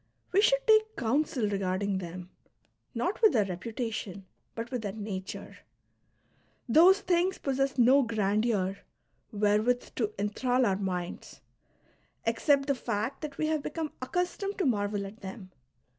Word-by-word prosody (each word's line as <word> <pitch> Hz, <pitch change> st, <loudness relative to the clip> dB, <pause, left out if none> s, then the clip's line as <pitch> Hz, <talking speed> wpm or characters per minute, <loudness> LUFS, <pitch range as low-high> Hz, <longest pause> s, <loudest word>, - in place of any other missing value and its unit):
we 390 Hz, -, +4 dB
should -, -, +3 dB
take 435 Hz, 0 st, +4 dB
counsel 255 Hz, -, 0 dB
regarding 195 Hz, 0 st, -1 dB
them, 180 Hz, 0 st, -8 dB, 0.6 s
not 355 Hz, -, -1 dB
with 435 Hz, -3 st, +6 dB
their 215 Hz, -4 st, +3 dB
reputation 200 Hz, 0 st, -5 dB, 0.3 s
but 230 Hz, +2 st, -5 dB
with 250 Hz, -3 st, -2 dB
their 205 Hz, -3 st, -4 dB
nature; 200 Hz, -3 st, -6 dB, 1.1 s
those 355 Hz, -, +6 dB
things 360 Hz, +1 st, +1 dB
possess 270 Hz, 0 st, -1 dB
no 255 Hz, +3 st, +6 dB
grandeur 210 Hz, -3 st, 0 dB, 0.5 s
wherewith 215 Hz, +3 st, +1 dB
to 220 Hz, -4 st, -1 dB
enthral 245 Hz, +5 st, +1 dB
our 195 Hz, -, +2 dB
minds, 180 Hz, -3 st, -4 dB, 0.8 s
except 275 Hz, +5 st, +2 dB
the 280 Hz, -, +2 dB
fact 230 Hz, -1 st, -3 dB
that 295 Hz, -3 st, -6 dB
we 310 Hz, -, 0 dB
have 310 Hz, -1 st, 0 dB
become 310 Hz, +1 st, -4 dB
accustomed 360 Hz, +8 st, -2 dB
to 380 Hz, -, 0 dB
marvel 205 Hz, -4 st, 0 dB
at 200 Hz, +3 st, -11 dB
them. 190 Hz, -1 st, -8 dB
230 Hz, 135 wpm, -29 LUFS, 200-290 Hz, 1.1 s, with